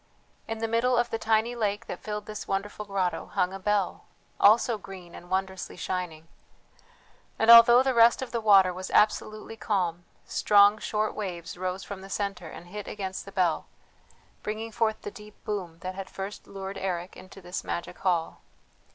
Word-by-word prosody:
In 225 - -3
the 225 0 -2
middle 235 +2 +2
of 240 0 +1
the 225 - -2
tiny 220 +2 +1
lake 210 -1 -2
that - - -7
filled 210 -1 -5
this 215 0 -7
wonderful 205 +2 -3
grotto 195 -3 -2
hung 180 +1 0
a 195 - -6
bell, 205 -1 -1 0.3
also 220 +1 +5
green 185 -3 -11
and 175 - -12
wondrously 190 0 -3
shining; 170 -3 -4 1.1
and 225 +1 +6
although 235 +2 +9
the 265 -1 +1
rest 235 +2 +5
of 245 - -7
the 235 -1 -2
water 195 -4 +6
was 185 +1 -6
absolutely 215 +1 +1
calm, 180 -6 -1 0.2
strong 205 +1 +5
short 215 0 -1
waves 180 -5 -5
rose 185 +1 -3
from 195 0 -7
the 195 - -11
centre 195 -4 -3
and 175 - -11
hit 210 +2 -7
against 190 -2 -5
the 195 - -10
bell, 180 -4 0 0.7
bringing 220 +2 -4
forth 220 0 0
the 205 - -5
deep 210 -2 -13
boom 190 -6 -4
that 185 0 -4
had 190 0 -7
first 195 +2 -7
lured 195 0 -6
Eric 180 -1 -3
into 185 +1 -12
this 180 0 -5
magic 170 - -5
hall. 175 -4 -1
200 Hz, 175 wpm, -27 LUFS, 185-215 Hz, 1.1 s, although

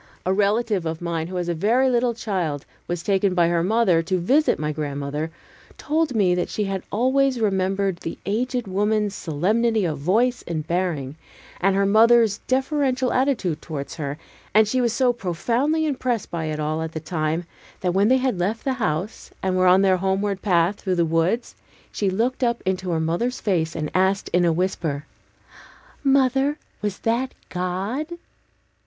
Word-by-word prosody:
A 185 - +2
relative 205 -2 +1
of 160 0 -3
mine, 170 -2 -2
who 185 +1 -5
as 175 -1 -2
a 175 - 0
very 225 +10 +2
little 240 -1 +1
child, 180 - -2 0.2
was 175 -1 -3
taken 195 -1 +1
by 170 -2 +4
her 170 -1 +1
mother 190 -4 +3
to 185 +3 -1
visit 270 - +2
my 150 0 -2
grandmother, 145 +1 -3 0.5
told 310 -3 0
me 190 -5 +3
that 180 0 -1
she 210 - -2
had 195 -2 -2
always 260 +3 +2
remembered 195 -2 0
the 165 - -6
aged 245 +3 -1
woman's 205 +1 0
solemnity 210 +7 +1
of 155 -4 -2
voice 235 - +1
and 160 -3 -3
bearing, 160 -5 -2 0.4
and 195 +1 +2
her 195 0 +2
mother's 225 +1 +5
deferential 265 -1 +1
attitude 230 - 0
towards 145 -2 -6
her: 145 -2 -4 0.4
and 215 0 +6
she 255 +4 +1
was 240 -2 +2
so 245 +2 +2
profoundly 240 - 0
impressed 255 -6 -2
by 165 -2 -3
it 155 -1 -3
all 155 +1 -1
at 160 0 -4
the 160 - -3
time, 160 +1 -2 0.4
that 180 -2 0
when 195 +2 +3
they 260 +2 +5
had 255 -7 -1
left 205 +6 -1
the 265 - 0
house, 180 +3 -2
and 190 -1 +1
were 185 0 +3
on 185 +2 +6
their 190 -1 +4
homeward 195 +1 -1
path 180 0 +2
through 185 -2 -1
the 170 -1 +2
woods, 165 +9 0 0.4
she 200 - 0
looked 235 +7 -1
up 235 -1 0
into 185 0 -1
her 165 -2 0
mother's 170 +11 -1
face 165 -6 0
and 150 -1 -3
asked 190 +1 +1
in 175 0 +4
a 170 - +3
whisper, 160 -4 -2 1.0
"Mother, 270 +1 +3 0.2
was 205 -2 -2
that 240 +3 0 0.2
God?" 190 +11 -2
195 Hz, 175 wpm, -23 LUFS, 170-235 Hz, 1.0 s, and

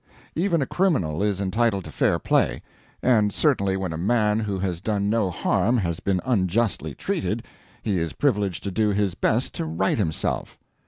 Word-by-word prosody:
Even 170 -3 +1
a - - -2
criminal 125 - +1
is 100 -2 0
entitled 100 0 0
to - - -8
fair - - +2
play; - - +1 0.4
and 110 -5 +4
certainly 100 -9 +1
when 95 -3 -3
a 80 - -4
man 105 +2 +2
who 105 -3 -2
has 90 -3 -2
done 100 -1 0
no 110 -4 +1
harm 100 +6 +1
has 85 -6 -1
been 95 -2 0
unjustly 100 - 0
treated, - - -2 0.4
he 100 -4 0
is 80 -2 -2
privileged 105 - 0
to 100 - -3
do 110 +2 +1
his 100 -2 +1
best - - 0
to - - -3
right 80 +7 0
himself. 80 -6 -2
100 Hz, 175 wpm, -24 LUFS, 90-115 Hz, 0.4 s, and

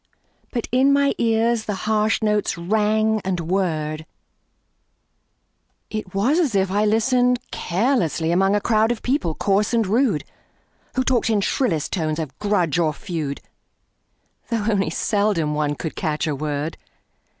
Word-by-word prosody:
But 235 -3 -3
in 260 +3 +4
my 280 0 +3
ears 230 0 +1
the 210 - -2
harsh 215 +1 +1
notes 210 -3 +1
rang 215 +4 +1
and 185 -2 -1
whirred; 160 -3 -2 1.8
It 215 -4 -5
was 255 - +2
as 285 - +1
if 190 -1 +1
I 205 +2 +2
listened 245 +3 +2
carelessly 175 - 0
Among 195 +3 +3
a 205 - +1
crowd 220 +1 +2
of 240 - -4
people 250 - 0
coarse 205 +3 +1
and 225 -2 +2
rude, 215 - +1 0.7
Who 260 - +2
talked 245 -3 +1
in 215 -2 +2
shrillest 175 - 0
tones 155 -4 -1
of 155 -5 -5
grudge 180 -7 +1
or 155 -3 +1
feud, 150 -3 -4 1.1
Though 230 -3 -1
only 200 -5 +1
seldom 200 -4 0
one 150 -1 0
could 160 +2 -5
catch 155 -3 -1
a 155 - -1
word. 150 +2 -3
205 Hz, 145 wpm, -22 LUFS, 165-225 Hz, 1.8 s, in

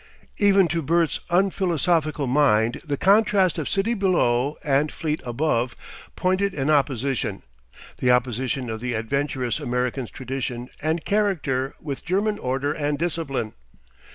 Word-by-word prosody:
Even 195 -3 +5
to 170 - 0
Bert's 165 +2 +1
unphilosophical 170 -5 +1
mind 125 -4 +2
the 145 -3 -2
contrast 195 -2 +3
of 150 - -3
city 200 +4 +1
below 150 - +1
and 145 +1 +2
fleet 155 -1 -3
above 120 -1 0 0.4
pointed 190 +2 0
an 140 +1 0
opposition, 135 -7 0 0.6
the 125 - +1
opposition 125 +1 +1
of 110 -1 -4
the 125 -1 -2
adventurous 130 +1 -1
American's 125 0 -2
tradition 125 -2 -5
and 160 +2 -1
character 155 -11 0
with 140 -3 -6
German 205 +3 0
order 135 +3 -1
and 145 -1 -1
discipline. 145 -9 -2
145 Hz, 125 wpm, -24 LUFS, 125-175 Hz, 0.6 s, Even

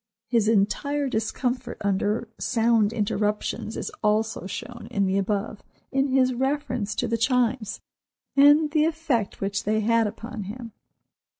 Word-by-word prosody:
His 230 -3 +2
entire 275 +7 +1
discomfort 245 +2 -2
under 205 +3 0
sound 225 -3 +2
interruptions 210 0 -1
is - - -4
also 215 -2 +1
shown 235 +5 -7
in 200 -1 +1
the 190 +1 +1
above, 205 +1 -2 0.3
in 270 +1 +2
his 260 -1 +3
reference 255 -4 -1
to - - -1
the 230 0 -1
Chimes, 245 -2 +1 0.5
and 290 +2 +6
the 305 0 +3
effect 310 -10 -1
which 200 +1 -1
they 215 +1 +1
had 230 0 +3
upon 225 0 -6
him. 230 +3 -7
230 Hz, 135 wpm, -25 LUFS, 210-255 Hz, 0.5 s, and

